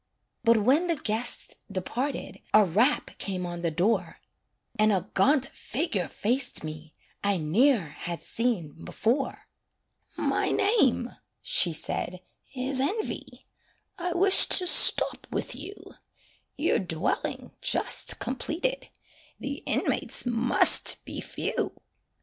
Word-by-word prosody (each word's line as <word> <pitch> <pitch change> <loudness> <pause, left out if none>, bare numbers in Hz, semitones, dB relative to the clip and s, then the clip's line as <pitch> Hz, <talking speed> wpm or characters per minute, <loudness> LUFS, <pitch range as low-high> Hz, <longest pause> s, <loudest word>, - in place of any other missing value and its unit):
But 230 -1 +4
when 270 - +2
the 335 - 0
guests 230 -3 -1 0.2
departed, 240 +9 -4 0.2
A 215 -1 +6
rap 220 - +1
came 185 -2 -4
on 175 -1 -6
the 170 - 0
door, 180 +8 -1 0.6
And 215 0 +4
a 190 0 -2
gaunt 275 -2 +3
figure 225 - -3
faced 245 0 -1
me 155 0 -9 0.3
I 200 -1 +1
ne'er 190 - +2
had 170 +3 -7
seen 180 -11 -3
before. 260 +5 -2 0.7
"My - - 0
name," 280 - +1 0.3
she 175 - +3
said, 175 +3 -4 0.3
"is 260 +1 +1
Envy; 405 +11 -4 0.5
I 355 0 -2
wish 385 +2 +8
to 365 - +7
stop 360 - +3
with - - -4
you; 405 - -8 0.8
Your 295 -3 +1
dwelling 170 -3 -3
just - - +2
completed, 330 - -3 0.5
The - - -6
inmates - - 0
must 240 0 +3
be - - -6
few." - - -4
230 Hz, 115 wpm, -26 LUFS, 180-280 Hz, 0.8 s, wish